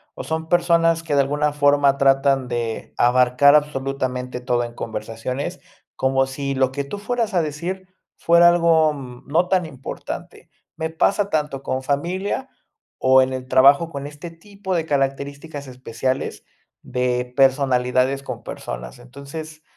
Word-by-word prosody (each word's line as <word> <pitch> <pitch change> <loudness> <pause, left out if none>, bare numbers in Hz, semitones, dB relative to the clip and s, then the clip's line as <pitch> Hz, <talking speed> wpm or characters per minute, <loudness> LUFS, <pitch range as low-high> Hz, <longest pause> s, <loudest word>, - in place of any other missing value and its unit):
o - - -6
son 160 0 -3
personas 170 -1 +3
que 155 -3 -2
de 140 - +5
alguna 145 +2 0
forma 145 -1 +3
tratan 135 -1 +3
de 120 -2 -4
abarcar 125 +3 +5
absolutamente 135 -4 -1
todo 125 -1 0
en 120 - -9
conversaciones, 115 +4 -5 0.4
como 135 0 +1
si 140 +1 -4
lo 130 -1 +2
que 140 - -2
tú 140 +9 -7
fueras 225 0 -2
a 175 - +3
decir 175 +5 -4 0.3
fuera 170 +1 +6
algo, 165 -3 +3
mm, 125 -3 -10
no 170 +5 +2
tan 180 -2 +1
importante. 135 -4 -8 0.3
Me 160 0 -3
pasa 200 +5 +1
tanto 150 -3 -2
con 130 0 -2
familia 185 - -2 0.5
o 130 0 +5
en 130 0 0
el 130 0 -5
trabajo 140 +5 +5
con 140 -3 -6
este 150 +3 -9
tipo 190 +3 -6
de 165 -2 0
características 140 +1 -3
especiales 130 +1 -4 0.4
de 125 0 -2
personalidades 130 -1 +2
con - - -7
personas. - - -7
Entonces, 140 +5 -10
140 Hz, 145 wpm, -21 LUFS, 130-160 Hz, 0.5 s, fuera